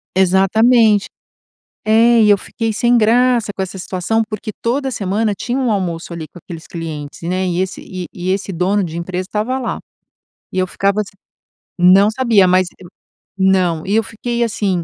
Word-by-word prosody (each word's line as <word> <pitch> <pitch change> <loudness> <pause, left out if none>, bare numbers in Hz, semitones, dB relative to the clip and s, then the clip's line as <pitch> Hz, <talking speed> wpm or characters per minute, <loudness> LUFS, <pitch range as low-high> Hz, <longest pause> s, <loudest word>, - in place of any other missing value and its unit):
Exatamente. 205 +4 +4 0.8
É, 230 +2 +4
e 210 -1 +5
eu 205 - +5
fiquei 225 +3 -3
sem 240 +3 +2
graça 235 0 +2
com 190 - -3
essa 190 +1 -6
situação, 185 +5 -1
porque 215 0 -5
toda 265 +3 -1
semana 210 -1 -1
tinha 250 +1 -2
um 255 -3 0
almoço, 175 -4 -2
ali, 165 -2 -6
com 165 - -15
aqueles 165 -2 -9
clientes, 155 -4 -7
né, 185 +2 -1
e 180 0 -1
esse 190 0 -3
e 185 -2 -7
e 185 +1 -4
esse 195 0 -2
dono 190 +4 +1
de 165 -3 -5
empresa 180 +1 -3
estava 220 +5 -2
lá. 250 -3 -3 0.7
E - - -3
eu 185 - +2
ficava 200 +3 0
assim 205 - -5 0.7
não 190 +3 +6
sabia, 225 -5 +3
mas 185 0 +3
e 185 - -13 0.5
não, 185 -4 +2
e 200 - 0
eu 225 - +3
fiquei 235 +3 -3
assim: 200 -6 -1
195 Hz, 180 wpm, -17 LUFS, 185-225 Hz, 0.8 s, não